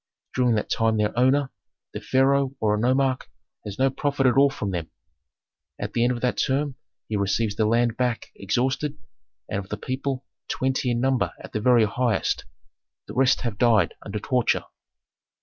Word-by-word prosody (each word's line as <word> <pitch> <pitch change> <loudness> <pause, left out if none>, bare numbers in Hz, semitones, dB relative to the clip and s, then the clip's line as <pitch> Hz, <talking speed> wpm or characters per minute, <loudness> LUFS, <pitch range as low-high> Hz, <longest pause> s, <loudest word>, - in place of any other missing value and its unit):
During 125 -3 +2
that 105 - -2
time 110 -1 +2
their 105 0 0
owner, 130 +3 +3 0.4
the - - -5
pharaoh 135 +1 +2
or 105 -1 +2
a 105 - 0
nomarch, 130 +2 +1 0.4
has 100 -2 -7
no 135 0 +3
profit 140 0 -1
at 125 - +4
all 140 +1 +6
from 105 -7 -4
them; 85 -3 -4 0.9
at - - -5
the 115 - +1
end 125 - +3
of 120 -1 -3
that 125 - 0
term 140 +1 0 0.3
he 110 - -2
receives 100 +1 0
the 110 0 +1
land 115 0 +2
back 125 -2 -1
exhausted, 130 +8 -1 0.5
and 100 - -2
of 95 0 -8
the 105 - -3
people, 130 +3 -3 0.2
twenty 130 -1 0
in 120 0 0
number 130 -1 +1
at - - -11
the 105 - -1
very 120 -1 +5
highest, 120 +3 0 0.6
the - - -9
rest 130 0 +3
have 115 -4 -4
died 110 -8 +4
under 105 0 -5
torture!" 125 +3 +1
125 Hz, 180 wpm, -24 LUFS, 110-130 Hz, 0.9 s, all